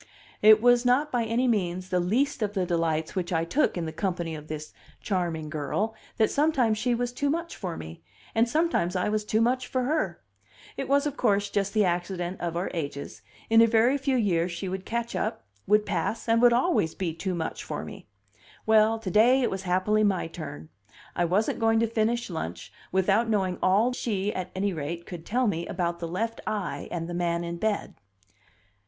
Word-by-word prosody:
It 215 +1 +7
was 245 0 +5
not 260 +5 +2
by 240 -2 +1
any 235 +3 +1
means 185 -5 -1
the 180 -1 +1
least 240 +10 0
of 205 -1 -1
the 185 -2 +1
delights 165 -2 0
which 185 -1 -2
I 165 -1 +1
took 260 - +1
in 170 - -2
the 160 - -4
company 175 -3 -2
of 155 -1 -8
this 155 0 -6 0.3
charming 170 -5 -2
girl 155 +9 -2 0.2
that 220 - +3
sometimes 270 -8 +2
she 245 0 +1
was 245 +1 -2
too 285 +3 -1
much 335 +3 -2
for 180 -4 -5
me, 80 +1 -9 0.3
and 230 +1 +3
sometimes 300 - +1
I 180 +2 +1
was 215 0 0
too 215 +1 +1
much 250 +2 +1
for 255 -1 -1
her. 245 - -1 0.6
It 270 - -4
was, 280 +1 +3
of 290 -1 -3
course, 205 -3 +1
just 200 +1 -1
the 210 -2 +4
accident 175 +1 -2
of 170 -1 -2
our 180 - -2
ages; 145 -4 -5 0.3
in 225 0 +6
a 230 - +6
very 230 +4 +4
few 270 -1 0
years 180 -6 +1
she 175 +3 -5
would 190 +1 -4
catch 235 0 -2
up, 215 - -2 0.2
would 210 +1 +4
pass, 230 - -2
would 230 +1 +5
always 240 - +2
be 175 -4 -2
too 180 +3 -3
much 160 -1 -4
for - - -5
me. - - -10 0.6
Well, 220 0 +4
to 215 -4 -5
day 245 +7 +5
it - - +1
was 190 - -3
happily 190 +4 +1
my 195 -3 +1
turn; 155 - -8 0.5
I 175 - +2
wasn't 195 +6 +1
going 225 -1 +3
to 230 - +3
finish 230 +1 0
lunch 90 - -5 0.2
without 195 +5 +2
knowing 190 -4 0
all 210 +7 +3
she, 205 -4 -2
at 185 -1 -4
any 195 +1 0
rate, 165 +2 -5
could 170 -2 -9
tell 250 +3 +1
me 170 -6 -1
about 170 -2 -2
the 170 - -4
left 225 +7 -3
eye 210 -3 -3
and 165 -1 -4
the 175 - -5
man 170 -1 0
in 170 0 -4
bed. 215 +2 -1
200 Hz, 205 wpm, -27 LUFS, 175-230 Hz, 0.6 s, It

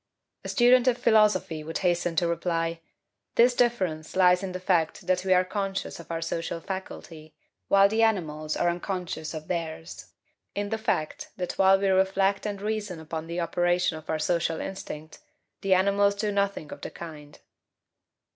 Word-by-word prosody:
A - - -6
student 250 0 +5
of 250 -1 +3
philosophy 210 -9 +3
would 160 +1 -4
hasten 175 -1 +1
to 170 +2 +2
reply: 165 -1 -1 0.6
"This 245 +2 +5
difference 185 -11 0
lies 180 -1 +5
in 195 -1 -4
the 185 - -5
fact 175 -4 0
that 180 0 +1
we 190 - -1
are 185 0 +5
conscious 195 -1 -3
of 170 - -12
our 165 0 -2
social 165 0 -3
faculty, 165 -4 -8 0.3
while 195 0 +6
the 220 +2 0
animals 155 -9 0
are 175 - +1
unconscious 175 -2 -3
of 155 0 -7
theirs 165 -1 -5 0.4
in 205 0 -2
the 220 +1 -2
fact 215 -9 -2
that 180 -2 -3
while 190 0 +6
we 200 - +1
reflect 195 +1 +2
and 200 -1 -5
reason 210 -5 -3
upon 160 0 -6
the 170 +1 -3
operation 175 0 +1
of 155 0 -11
our 160 - 0
social 165 0 0
instinct, 155 -5 -7 0.4
the 195 -1 +3
animals 200 +2 +3
do 210 +1 -1
nothing 200 -6 -1
of - - -9
the - - -5
kind." 150 -3 -10
180 Hz, 170 wpm, -27 LUFS, 165-200 Hz, 0.6 s, while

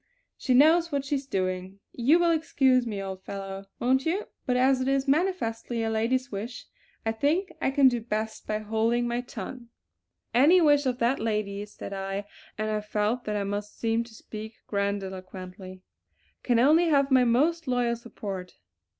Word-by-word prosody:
She 255 - +1
knows 330 +5 +5
what 280 -1 -1
she's 275 -1 -2
doing. 185 -2 -2
You 265 +7 +4
will 345 -1 +3
excuse 265 -6 +2
me, 210 -3 -3
old 190 -1 -5
fellow, 195 0 -6
won't 260 +2 +2
you; 360 +7 -1 0.2
but 250 -1 +2
as 260 +1 +3
it 255 - -1
is 275 +1 +1
manifestly 260 -8 0
a 225 - -1
lady's 250 +4 0
wish, 220 +5 -6 0.4
I 225 - +2
think 310 - 0
I - - +2
can 270 0 +5
do 245 -2 +1
best 220 -1 -4
by 215 - 0
holding 225 +3 0
my 240 +1 -1
tongue." 240 +1 -8 0.6
"Any 295 +9 +6
wish 290 -4 +4
of 250 -1 0
that 245 +2 +1
lady's," 210 -2 -2
said - - -7
I, 195 +1 -4 0.3
and 215 0 -1
I 215 0 -1
felt 210 +3 -1
that 210 - -2
I 205 - 0
must 205 +1 -4
seem 230 0 +1
to 230 - -15
speak 220 +1 -8
grandiloquently, 190 -2 -5 0.6
"can 240 -2 +2
only 305 +8 +5
have 280 -3 +3
my 260 -1 +6
most 300 +7 +2
loyal 245 -2 +1
support." 200 -6 -7
235 Hz, 175 wpm, -27 LUFS, 205-270 Hz, 0.6 s, Any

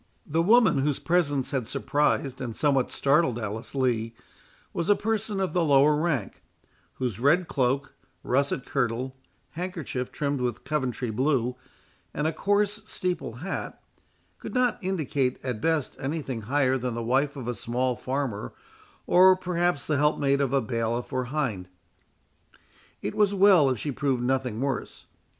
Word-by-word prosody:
The 160 +2 +1
woman, 215 - +5
whose 145 0 +1
presence 145 -6 0
had 130 -5 -2
surprised 145 -1 0
and 120 -3 -5
somewhat 135 -4 +2
startled 140 -3 +2
Alice 110 +3 -5
Lee, 115 -4 0 0.6
was 170 - -2
a 205 - +6
person 215 -1 -2
of 190 -5 -1
the 180 - +2
lower 145 0 +5
rank, 150 - -1 0.5
whose 120 -5 -3
red 160 +7 +3
cloak, 135 +1 0 0.3
russet 140 +3 0
kirtle, 130 0 -1 0.4
handkerchief 165 -8 -4
trimmed 140 -2 -2
with 120 -2 -2
Coventry 130 -5 -2
blue, 125 0 +1 0.6
and 150 - -1
a 160 - +1
coarse 205 +3 +1
steeple 180 - -3
hat, 195 - -4 0.6
could - - -8
not 250 -1 +2
indicate 150 -9 -1
at 125 -4 -3
best 160 -2 0
any 150 +4 -3
thing 125 -5 -4
higher 130 +3 +1
than 125 -1 -3
the 115 - -3
wife 135 +5 +1
of 130 -4 -6
a 120 - -1
small 125 +2 -1
farmer, 130 - -3 0.5
or, 185 +1 +7
perhaps, 175 -3 -1
the 150 - 0
helpmate 140 -1 +2
of 135 -3 0
a 135 -1 +2
bailiff 115 +2 -2
or 130 -1 0
hind. 125 -9 -2 1.4
It 105 - -2
was 205 -1 +2
well 190 -7 +6
if 130 - 0
she 145 +7 -3
proved 130 -2 -1
nothing 125 -3 0
worse. 135 0 -3
140 Hz, 155 wpm, -26 LUFS, 125-165 Hz, 1.4 s, or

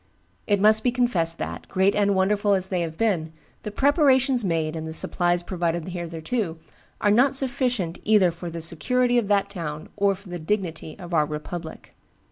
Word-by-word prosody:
It 205 -1 +2
must 215 +2 +5
be 245 - +2
confessed 190 -10 +1
that, - - -6
great 190 +1 +2
and 200 -1 +2
wonderful 200 +2 +2
as 190 0 -2
they 180 -2 0
have 160 -1 -4
been, 180 -8 0 0.3
the - - -5
preparations 270 0 +3
made 165 -4 -1
and 160 0 -5
the 160 - -6
supplies 175 +1 +1
provided 175 -2 -2
hitherto 170 +2 -3 0.4
are 205 - +3
not 260 +6 +4
sufficient 245 -9 -1
either 205 -5 +4
for 170 +1 -7
the 165 -1 -6
security 245 +10 +1
of 220 - -3
that 200 -1 +2
town 155 -5 -6
or 200 -1 +2
for 195 0 -15
the 175 0 -5
dignity 165 -3 -3
of 175 -3 -9
our 155 -2 +3
republic. 160 +2 -7
190 Hz, 180 wpm, -24 LUFS, 165-215 Hz, 0.4 s, must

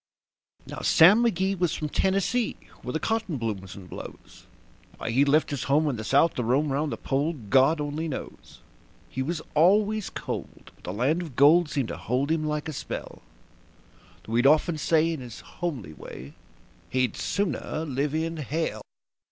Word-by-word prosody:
Now - - -7
Sam 205 +9 +6
McGee 195 -4 +1
was 175 -3 +1
from 155 - -3
Tennessee, 195 - 0 0.3
where 125 - -5
the 160 - -1
cotton 220 -8 -1
blooms 100 -6 -4
and 95 -2 -11
blows. - - -11 0.5
Why - - -3
he 130 +4 +4
left 145 +2 +2
his 140 -4 -3
home 150 +3 +3
in 130 - -2
the 110 - -5
South 140 +8 +3
to 125 - -2
roam 135 +5 +1
'round 145 +2 -1
the - - -3
Pole, 145 +5 -1
God 135 +4 +3
only 150 +2 -3
knows. 145 - -8 0.5
He 130 - -3
was 155 +3 -3
always 205 +6 +3
cold, - - -7
but - - -19
the - - -3
land 135 - +1
of 160 -8 -8
gold 150 +5 +6
seemed 135 -6 -1
to - - -5
hold 130 +5 -1
him 160 -1 +1
like 150 0 -2
a 155 - -4
spell; - - -6 1.0
Though 110 - -7
he'd 120 +3 +4
often 155 +2 +3
say 165 +2 +2
in 160 - -5
his 120 -3 -9
homely 135 - -5
way 70 -2 -10 0.6
that - - -2
he'd 125 -3 +1
"sooner 165 -4 -2
live 140 +1 -1
in 165 +1 -2
hell". 150 -6 -2
150 Hz, 180 wpm, -26 LUFS, 130-165 Hz, 1.0 s, Sam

